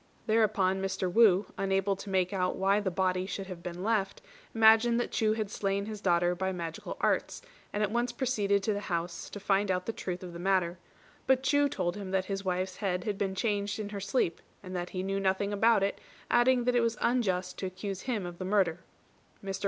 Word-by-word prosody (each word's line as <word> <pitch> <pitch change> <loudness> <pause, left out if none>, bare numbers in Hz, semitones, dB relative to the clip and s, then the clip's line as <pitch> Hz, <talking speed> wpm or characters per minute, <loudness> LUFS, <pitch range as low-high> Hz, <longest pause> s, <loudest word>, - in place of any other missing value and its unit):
Thereupon 210 -4 +2
Mr. 190 -2 -2
Wu, 210 -4 +5
unable 195 0 +1
to 200 - -8
make 185 0 +1
out 185 -1 0
why 195 +2 +2
the 205 -2 -1
body 185 0 0
should 195 0 -4
have 185 -3 -8
been 175 +1 -6
left, 210 -3 0 0.4
imagined 225 +2 +6
that 240 - -2
Chu 215 -1 +2
had 215 -2 -3
slain 200 0 -1
his 215 -1 -6
daughter 175 -2 +2
by 190 +1 -2
magical 170 -3 -5
arts, - - 0 0.3
and 210 - -1
at 210 - 0
once 240 +1 0
proceeded 205 -7 0
to 215 - +1
the 205 - -2
house 170 0 -3
to 205 - -7
find 200 0 +1
out 180 -1 0
the 225 - -3
truth 180 -3 -5
of 180 -1 -8
the 170 - -7
matter; 180 -2 +1 0.5
but 265 0 +3
Chu 285 +1 +3
told 180 -5 -2
him 200 -2 -6
that 190 0 0
his 195 0 -3
wife's 185 0 -2
head 180 -3 -1
had 205 -3 -3
been 190 -1 -1
changed 205 0 -1
in 210 -2 -4
her 205 -1 -5
sleep, 195 -4 0 0.2
and 185 -1 -7
that 175 0 -3
he 185 0 -4
knew 195 +1 -1
nothing 195 +1 0
about 220 0 +4
it, 200 - -1 0.3
adding 245 +1 +4
that 250 +1 +2
it 240 - +4
was 230 -1 0
unjust 190 -7 0
to 190 - -2
accuse 190 +1 -5
him 230 -7 -2
of 175 -1 -8
the - - -3
murder. 185 -4 +1 0.7
Mr. 195 -1 -3
195 Hz, 220 wpm, -30 LUFS, 185-215 Hz, 0.7 s, imagined